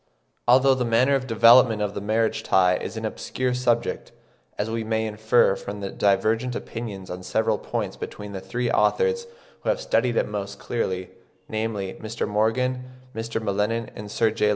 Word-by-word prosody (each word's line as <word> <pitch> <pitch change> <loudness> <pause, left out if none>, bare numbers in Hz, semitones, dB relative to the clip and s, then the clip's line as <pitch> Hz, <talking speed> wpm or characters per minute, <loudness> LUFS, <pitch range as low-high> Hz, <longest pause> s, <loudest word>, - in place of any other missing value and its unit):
Although 130 +2 +6
the 130 -1 -1
manner 120 +4 +3
of 130 -1 0
development 115 0 +6
of 105 -1 -1
the - - -5
marriage 110 +2 0
tie 90 -1 +3
is 110 - -6
an 110 - -3
obscure 125 +3 -2
subject, 120 -2 0 0.5
as 105 - -1
we 115 0 -2
may 110 0 -1
infer 110 -1 +3
from 100 +1 -7
the 100 - -4
divergent 110 +5 +1
opinions 105 -6 -6
on 90 +1 -6
several 110 +3 0
points - - -4
between 105 0 -7
the 95 -1 -6
three 120 +6 -2
authors 470 0 +2 0.3
who - - -2
have - - +1
studied 120 +1 +1
it - - +2
most 100 -1 -5
closely, 95 -6 -3 0.4
namely, 110 -3 -3
Mr. 110 +1 -3
Morgan, 125 +5 0 0.3
Mr. 115 0 -3
M'Lennan, 110 +2 -1
and 105 0 -8
Sir 110 +1 +2
J. 105 -1 +1
110 Hz, 175 wpm, -24 LUFS, 105-120 Hz, 0.5 s, Although